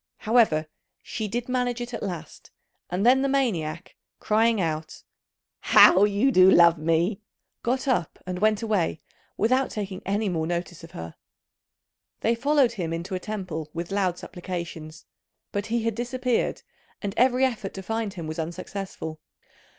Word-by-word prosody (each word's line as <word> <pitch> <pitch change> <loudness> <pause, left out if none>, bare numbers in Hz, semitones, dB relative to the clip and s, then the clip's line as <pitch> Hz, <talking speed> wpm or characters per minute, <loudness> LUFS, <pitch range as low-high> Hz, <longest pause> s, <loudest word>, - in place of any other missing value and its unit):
However, 215 -9 +3 0.4
she 220 -2 -4
did 240 +4 -3
manage 250 -1 -1
it 240 0 -6
at - - -4
last, 180 -5 -7 0.4
and 185 +4 -1
then 260 +2 +6
the 275 - +1
maniac 185 - -1 0.2
crying 225 +1 +2
out, 155 -3 -3 0.6
"How 190 +3 +7
you 210 +6 +2
do 185 -5 +7
love 170 -3 +6
me!" 165 +6 +1 0.4
got 255 +3 -1
up 240 - 0
and 180 0 -4
went 215 +2 +2
away 200 -8 0 0.4
without 255 +5 +2
taking 195 -3 -5
any 205 +2 -1
more 160 -4 -1
notice 175 -1 -4
of 165 - -10
her. 80 0 -7 1.1
They 230 - +2
followed 275 +1 +3
him 180 -8 -4
into 170 +4 -5
a 185 - -1
temple 180 -7 -5
with 170 +2 -4
loud 190 -3 0
supplications, 170 -4 -7 0.5
but 205 0 -3
he 230 0 0
had 230 0 0
disappeared, 245 +1 -1 0.4
and 200 -1 -2
every 255 +2 +4
effort 225 -6 -3
to 190 - -6
find 225 -1 -3
him 170 -3 -6
was 155 +1 -5
unsuccessful. 170 -1 -5
200 Hz, 155 wpm, -25 LUFS, 170-235 Hz, 1.1 s, How